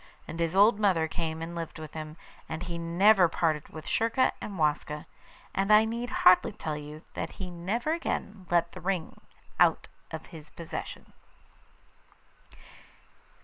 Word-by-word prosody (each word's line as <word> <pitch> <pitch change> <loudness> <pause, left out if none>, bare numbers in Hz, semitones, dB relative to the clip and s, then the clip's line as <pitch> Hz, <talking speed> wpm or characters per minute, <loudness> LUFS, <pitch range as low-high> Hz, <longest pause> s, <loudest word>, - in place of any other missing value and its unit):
And 165 - -7
his 165 +1 0
old 205 +2 +6
mother 185 -6 +3
came 160 -1 -3
and 170 +1 -6
lived 165 -1 -5
with 155 -1 -9
him, 155 0 -7 0.3
and 160 +2 -4
he 170 -1 -4
never 180 +2 +5
parted 155 -2 0
with 155 - -9
Schurka 230 +3 +2
and 200 -2 -6
Waska; 150 -1 0 0.5
and 195 +2 +1
I 215 +1 +7
need 235 +2 -3
hardly 185 +1 +5
tell 155 -6 -4
you 150 +1 -8
that - - -4
he 185 -2 -6
never 205 - -1
again 205 - -3
let 170 -1 +2
the 180 - -10
ring 180 -2 -3 0.4
out - - +4 0.2
of 160 0 -7
his 155 -2 -10
possession. 165 +1 -7
170 Hz, 150 wpm, -29 LUFS, 160-200 Hz, 0.5 s, I